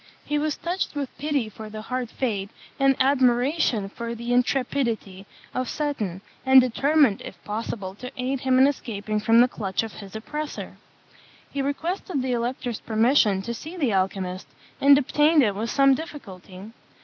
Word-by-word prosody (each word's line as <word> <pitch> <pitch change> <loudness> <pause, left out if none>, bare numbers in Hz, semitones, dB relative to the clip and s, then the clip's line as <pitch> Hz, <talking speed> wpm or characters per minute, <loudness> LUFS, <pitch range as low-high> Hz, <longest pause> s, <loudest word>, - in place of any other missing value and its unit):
He 295 0 0
was 300 0 -1
touched 355 -2 -3
with 280 -3 -4
pity 285 -5 0
for 215 +1 -9
the 215 0 -7
hard 250 0 -3
fate, 205 -7 -2 0.3
and 275 0 +4
admiration 255 -3 +2
for 235 +3 -6
the 235 +1 -3
intrepidity 245 -6 0 0.3
of 255 -1 -2
Seton; 215 - -3 0.2
and 265 0 +8
determined, 265 -1 +3
if - - -8
possible, 210 -2 -4
to 250 +6 -8
aid 255 +2 -1
him 260 0 +2
in 260 - +7
escaping 215 -6 -2
from 225 +2 +5
the 245 - +6
clutch 200 -4 -2
of 225 - -7
his 200 0 -11
oppressor. 300 +7 -5 0.7
He 280 - -2
requested 295 +2 -2
the 260 - -1
elector's 245 -1 -2
permission 220 -3 +2
to 235 - -3
see 315 +9 -8
the 270 - +1
alchymist, 185 -1 -1 0.3
and 280 0 +8
obtained 295 +2 +4
it 210 -4 +2
with 220 +4 -3
some 275 -1 +5
difficulty. 205 - -8
245 Hz, 160 wpm, -25 LUFS, 215-280 Hz, 0.7 s, and